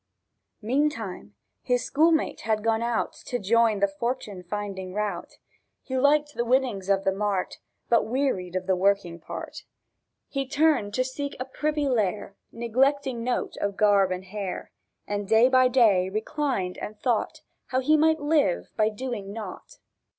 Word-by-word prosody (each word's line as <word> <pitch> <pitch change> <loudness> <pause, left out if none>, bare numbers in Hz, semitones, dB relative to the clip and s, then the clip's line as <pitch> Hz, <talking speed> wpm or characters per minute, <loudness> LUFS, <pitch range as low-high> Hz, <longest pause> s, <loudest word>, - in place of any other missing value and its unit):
Meantime 230 -6 -1 0.3
his 245 -1 0
schoolmate 315 +2 +2
had 215 -1 0
gone 225 0 +1
out 235 -1 -1
To 245 - -1
join 225 -1 +2
the 200 - +5
fortune 205 -1 -4
finding 190 0 -5
rout; 210 -4 -3 0.5
He 260 - -5
liked 290 +2 +3
the 240 - -1
winnings 240 -6 0
of 195 -1 +2
the 195 - +2
mart, 195 -1 -2 0.3
But 235 -2 +3
wearied 220 -8 -1
of 185 0 -2
the 190 - +2
working 185 -2 +1
part. - - -7 0.7
He 275 -2 -3
turned 280 -9 +2
to 255 - +2
seek 280 +2 -5
a 255 - -3
privy 295 +2 -1
lair, 210 -5 -1 0.2
Neglecting 255 +2 0
note 245 +1 -2
of 200 -1 -2
garb 200 -3 +4
and 185 +1 -4
hair, 195 -1 -5 0.3
And 205 -1 -3
day 225 +4 +5
by 255 -1 +5
day 215 -8 +4
reclined 215 -2 -2
and 210 0 -7
thought 240 -4 -1 0.3
How 260 - 0
he 300 +4 +3
might 315 +1 +3
live 290 - +1
by 215 -1 +3
doing 220 -3 -5
nought. 205 -3 -8
225 Hz, 155 wpm, -26 LUFS, 200-260 Hz, 0.7 s, the